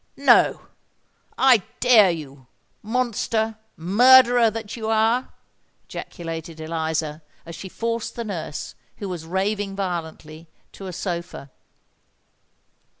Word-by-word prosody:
"No—I 255 Hz, -5 st, +1 dB, 0.2 s
dare 230 Hz, -6 st, +6 dB
you—monster, 215 Hz, -, -3 dB, 0.2 s
murderer 245 Hz, +6 st, +6 dB
that 220 Hz, +1 st, -6 dB
you 220 Hz, -2 st, -4 dB
are!" 225 Hz, +3 st, +1 dB, 0.5 s
ejaculated 165 Hz, -2 st, -7 dB
Eliza, 160 Hz, -1 st, -3 dB, 0.2 s
as 170 Hz, -, -9 dB
she 190 Hz, -, -8 dB
forced 230 Hz, +3 st, -3 dB
the 235 Hz, -, -4 dB
nurse, 165 Hz, -8 st, -5 dB, 0.2 s
who 200 Hz, -, -5 dB
was 170 Hz, -3 st, -6 dB
raving 195 Hz, +2 st, -2 dB
violently, 165 Hz, -4 st, -5 dB, 0.2 s
to 195 Hz, -, -9 dB
a -, -, -5 dB
sofa. 170 Hz, -6 st, -5 dB
195 Hz, 95 wpm, -23 LUFS, 165-225 Hz, 0.5 s, dare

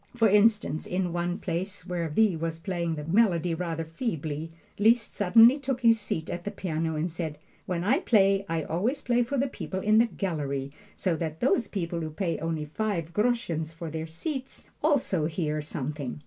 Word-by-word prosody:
For 225 Hz, -2 st, +4 dB
instance, 210 Hz, -5 st, +3 dB
in 180 Hz, -1 st, -1 dB
one 175 Hz, +1 st, -1 dB
place 185 Hz, 0 st, -4 dB
where 175 Hz, -3 st, -2 dB
V. 200 Hz, +4 st, +3 dB
was 165 Hz, 0 st, -3 dB
playing 170 Hz, -2 st, -2 dB
the 150 Hz, -, -5 dB
melody 175 Hz, -1 st, +2 dB
rather 165 Hz, -1 st, -3 dB
feebly, 160 Hz, -, -4 dB, 0.3 s
Liszt 225 Hz, +2 st, +3 dB
suddenly 225 Hz, +7 st, +6 dB
took 270 Hz, -2 st, -2 dB
his 230 Hz, -2 st, +5 dB
seat 160 Hz, -6 st, -3 dB
at 175 Hz, -, -4 dB
the 205 Hz, -, -3 dB
piano 165 Hz, -5 st, -2 dB
and 160 Hz, +3 st, -1 dB
said, 160 Hz, -2 st, -4 dB, 0.3 s
"When 175 Hz, -2 st, -1 dB
I 250 Hz, -, +3 dB
play, 195 Hz, -, +3 dB
I 165 Hz, -1 st, 0 dB
always 220 Hz, -, -1 dB
play 245 Hz, 0 st, +2 dB
for 245 Hz, +4 st, -1 dB
the 270 Hz, +2 st, +2 dB
people 190 Hz, -6 st, -5 dB
in 215 Hz, +3 st, +4 dB
the 235 Hz, -, +5 dB
gallery, 140 Hz, -10 st, -3 dB, 0.3 s
so 180 Hz, -4 st, 0 dB
that 160 Hz, -1 st, -4 dB
those 240 Hz, -3 st, +2 dB
people 170 Hz, -4 st, -3 dB
who 160 Hz, -, -3 dB
pay 165 Hz, +1 st, -2 dB
only 160 Hz, -1 st, -2 dB
five 170 Hz, 0 st, -2 dB
groschens 195 Hz, -9 st, 0 dB
for 165 Hz, -1 st, -6 dB
their 160 Hz, +1 st, -4 dB
seats 265 Hz, -, -6 dB, 0.2 s
also 250 Hz, -, +2 dB
hear 155 Hz, -2 st, -2 dB
something." 145 Hz, -2 st, -5 dB
175 Hz, 185 wpm, -28 LUFS, 160-220 Hz, 0.3 s, suddenly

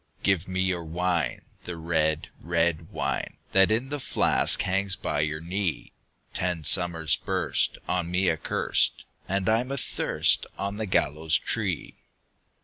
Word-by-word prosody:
"Give 95 Hz, -3 st, +1 dB
me 95 Hz, 0 st, -2 dB
your 90 Hz, -2 st, -1 dB
wine, 85 Hz, -1 st, -2 dB, 0.2 s
the 90 Hz, -1 st, -6 dB
red, 80 Hz, -1 st, -1 dB
red 85 Hz, -1 st, 0 dB
wine, -, -, -3 dB
That 95 Hz, 0 st, +5 dB
in 115 Hz, +5 st, 0 dB
the 145 Hz, 0 st, -4 dB
flask -, -, +3 dB
hangs 95 Hz, 0 st, +1 dB
by -, -, -3 dB
your 75 Hz, +1 st, -1 dB
knee! 90 Hz, 0 st, -3 dB, 0.4 s
Ten 90 Hz, -3 st, -2 dB
summers 80 Hz, -5 st, +5 dB
burst -, -, -1 dB
on 90 Hz, -2 st, -1 dB
me 90 Hz, +1 st, +1 dB
accurst, 80 Hz, -3 st, 0 dB, 0.3 s
And 95 Hz, 0 st, -1 dB
I'm 115 Hz, +4 st, +1 dB
athirst 140 Hz, -3 st, +1 dB
on 100 Hz, +1 st, -4 dB
the 110 Hz, -1 st, -3 dB
gallows 80 Hz, -1 st, +2 dB
tree." -, -, -3 dB
90 Hz, 140 wpm, -26 LUFS, 80-95 Hz, 0.4 s, That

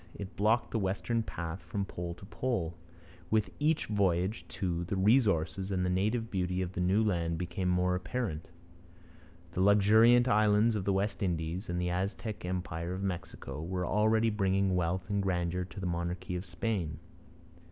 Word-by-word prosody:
It 100 Hz, -1 st, -7 dB
blocked 110 Hz, +3 st, +2 dB
the 115 Hz, -, 0 dB
westward 105 Hz, +4 st, -1 dB
path 85 Hz, +2 st, -5 dB
from 100 Hz, -3 st, -3 dB
pole 85 Hz, -2 st, -5 dB
to 95 Hz, -, -12 dB
pole. 100 Hz, -6 st, -2 dB, 0.5 s
With 110 Hz, -1 st, +1 dB
each 150 Hz, +1 st, +2 dB
voyage, 95 Hz, 0 st, 0 dB
too, 85 Hz, -2 st, -2 dB
the 95 Hz, -, -2 dB
resources 95 Hz, -4 st, +2 dB
and 90 Hz, -2 st, 0 dB
the 90 Hz, -, +1 dB
native 110 Hz, +5 st, 0 dB
beauty 90 Hz, -1 st, 0 dB
of 90 Hz, -, -4 dB
the 90 Hz, -, -2 dB
new 95 Hz, +5 st, +3 dB
land 85 Hz, -5 st, 0 dB
became 90 Hz, +2 st, -2 dB
more 90 Hz, 0 st, +2 dB
apparent. 95 Hz, -2 st, -3 dB, 1.0 s
The 90 Hz, -, -1 dB
luxuriant 110 Hz, +5 st, +6 dB
islands 105 Hz, 0 st, +4 dB
of 100 Hz, -3 st, -2 dB
the 100 Hz, -, +2 dB
West 100 Hz, +1 st, -1 dB
Indies, 85 Hz, +1 st, -2 dB
and 90 Hz, 0 st, -1 dB
the 90 Hz, 0 st, 0 dB
Aztec 100 Hz, +4 st, -3 dB
empire 90 Hz, -1 st, -3 dB
of 95 Hz, -, -5 dB
Mexico, 90 Hz, -4 st, -5 dB
were 90 Hz, +2 st, -2 dB
already 110 Hz, +3 st, +3 dB
bringing 95 Hz, -2 st, +1 dB
wealth 90 Hz, +1 st, -1 dB
and 100 Hz, -1 st, 0 dB
grandeur 90 Hz, -1 st, -1 dB
to 95 Hz, -, -10 dB
the 95 Hz, -, -4 dB
monarchy 90 Hz, +1 st, -2 dB
of 90 Hz, +2 st, -4 dB
Spain. 90 Hz, -3 st, -2 dB
95 Hz, 170 wpm, -31 LUFS, 90-105 Hz, 1.0 s, luxuriant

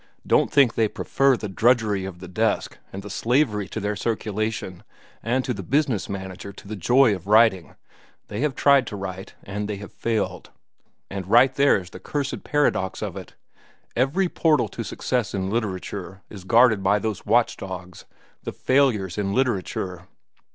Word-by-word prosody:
Don't -, -, +3 dB
think 140 Hz, -5 st, +5 dB
they 110 Hz, -, +2 dB
prefer 135 Hz, +4 st, +1 dB
the 105 Hz, -, -5 dB
drudgery 110 Hz, -1 st, +2 dB
of 95 Hz, -2 st, -7 dB
the 90 Hz, +1 st, -10 dB
desk 110 Hz, +3 st, -1 dB
and 95 Hz, +1 st, -7 dB
the 105 Hz, -, -8 dB
slavery 115 Hz, -3 st, +1 dB
to 110 Hz, -, -5 dB
their 105 Hz, 0 st, -2 dB
circulation 110 Hz, -4 st, -3 dB, 0.4 s
and 125 Hz, +3 st, 0 dB
to 125 Hz, -, -1 dB
the 100 Hz, -, -6 dB
business 130 Hz, -, 0 dB
manager 95 Hz, 0 st, -6 dB
to 100 Hz, -, -14 dB
the 110 Hz, -, -5 dB
joy 120 Hz, +5 st, +4 dB
of 95 Hz, -1 st, -7 dB
writing. 105 Hz, -6 st, +4 dB, 0.5 s
They 105 Hz, -, -5 dB
have 145 Hz, 0 st, 0 dB
tried 140 Hz, -4 st, +4 dB
to 105 Hz, -, -5 dB
write, 95 Hz, -1 st, -7 dB
and 105 Hz, +1 st, -4 dB
they 105 Hz, -, -3 dB
have 100 Hz, 0 st, -9 dB
failed. 115 Hz, -3 st, -2 dB, 0.6 s
And 95 Hz, -2 st, -5 dB
right 125 Hz, +4 st, +6 dB
there 140 Hz, +1 st, +4 dB
is 90 Hz, -1 st, -11 dB
the -, -, -9 dB
cursed 145 Hz, -2 st, -3 dB
paradox 125 Hz, -10 st, 0 dB
of 100 Hz, -4 st, -4 dB
it. 95 Hz, -2 st, -9 dB, 0.6 s
Every 140 Hz, +10 st, +2 dB
portal 160 Hz, -3 st, +2 dB
to 115 Hz, -, -5 dB
success 120 Hz, -2 st, -2 dB
in 95 Hz, 0 st, -2 dB
literature 95 Hz, -4 st, -4 dB
is 95 Hz, -3 st, -10 dB
guarded 115 Hz, -1 st, +5 dB
by 95 Hz, +2 st, +3 dB
those 105 Hz, -1 st, -4 dB
watch 115 Hz, +3 st, +3 dB
dogs, 90 Hz, -2 st, -8 dB, 0.4 s
the -, -, -5 dB
failures 115 Hz, -, +1 dB
in 100 Hz, -1 st, -1 dB
literature. 95 Hz, -7 st, -2 dB
105 Hz, 170 wpm, -24 LUFS, 95-125 Hz, 0.6 s, right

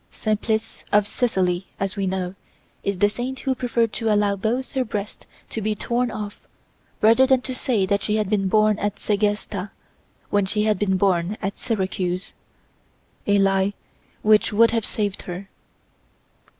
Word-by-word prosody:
Simplice 220 Hz, +1 st, -1 dB
of 205 Hz, 0 st, +5 dB
Sicily, 190 Hz, -6 st, 0 dB
as 195 Hz, 0 st, -2 dB
we 195 Hz, -2 st, -1 dB
know, 185 Hz, -1 st, -2 dB, 0.5 s
is 200 Hz, -1 st, -1 dB
the 205 Hz, -, +4 dB
saint 245 Hz, +5 st, -4 dB
who 265 Hz, -, +1 dB
preferred 235 Hz, -3 st, 0 dB
to 225 Hz, -2 st, 0 dB
allow 205 Hz, -1 st, +3 dB
both 230 Hz, +6 st, -1 dB
her 265 Hz, -, 0 dB
breasts 210 Hz, -3 st, -5 dB, 0.2 s
to 220 Hz, -, -2 dB
be 215 Hz, +1 st, 0 dB
torn 240 Hz, +3 st, 0 dB
off 210 Hz, -2 st, -6 dB, 0.6 s
rather 230 Hz, +5 st, +6 dB
than 260 Hz, -1 st, +4 dB
to 255 Hz, -, -4 dB
say 240 Hz, -6 st, +1 dB
that 200 Hz, +1 st, +1 dB
she 210 Hz, -, 0 dB
had 215 Hz, -2 st, +1 dB
been 195 Hz, -1 st, +1 dB
born 215 Hz, +1 st, +3 dB
at 205 Hz, -1 st, -1 dB
Segesta 205 Hz, -2 st, -1 dB, 0.6 s
when 205 Hz, -1 st, +2 dB
she 210 Hz, +2 st, +1 dB
had 215 Hz, -3 st, +2 dB
been 190 Hz, -2 st, +2 dB
born 185 Hz, +1 st, +1 dB
at 195 Hz, +1 st, -3 dB
Syracuse—a 190 Hz, 0 st, -4 dB
lie 195 Hz, 0 st, +2 dB, 0.5 s
which 215 Hz, 0 st, +4 dB
would 230 Hz, +2 st, +5 dB
have 225 Hz, -2 st, 0 dB
saved 205 Hz, -3 st, -2 dB
her. 180 Hz, +3 st, -6 dB
210 Hz, 160 wpm, -23 LUFS, 195-225 Hz, 0.6 s, rather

